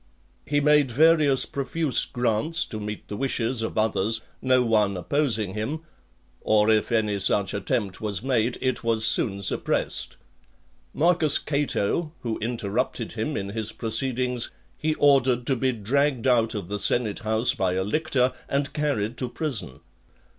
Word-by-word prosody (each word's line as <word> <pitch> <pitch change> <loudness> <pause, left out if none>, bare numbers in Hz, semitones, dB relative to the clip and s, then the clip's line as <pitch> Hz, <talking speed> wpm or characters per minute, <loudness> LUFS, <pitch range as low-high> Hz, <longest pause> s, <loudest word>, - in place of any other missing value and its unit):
He 145 0 +2
made 150 -2 +4
various 150 0 +4
profuse 140 +1 0
grants 120 +6 +1
to 110 - -7
meet 105 0 -6
the 105 - -5
wishes 120 0 -1
of 110 - -4
others, 110 0 +1 0.2
no 130 -1 +3
one 105 -4 +2
opposing 110 -3 -1
him; 125 +10 -3 0.6
or 110 0 +3
if 110 +1 +1
any 105 -3 +1
such 95 0 +1
attempt 100 -1 -2
was 105 -1 -3
made, 125 -2 0
it 130 -2 -1
was 115 -1 +2
soon 100 -4 +1
suppressed. - - -1 0.7
Marcus 160 -2 +3
Cato, 150 +1 -1
who 115 -2 -3
interrupted 110 -3 -2
him - - -3
in 100 -1 -4
his 110 +1 -3
proceedings, 125 +1 -1 0.3
he 155 0 -1
ordered 130 -4 +3
to 135 - +2
be 130 +1 +1
dragged 130 +4 0
out 115 -3 +3
of 100 -5 -5
the 105 +2 -4
senate 110 -1 +1
house 110 +2 +1
by 95 -2 0
a 95 +1 0
lictor, 130 +2 0 0.2
and 140 0 -1
carried 135 -7 -1
to 125 - -1
prison. 125 - -3
120 Hz, 150 wpm, -25 LUFS, 105-140 Hz, 0.7 s, made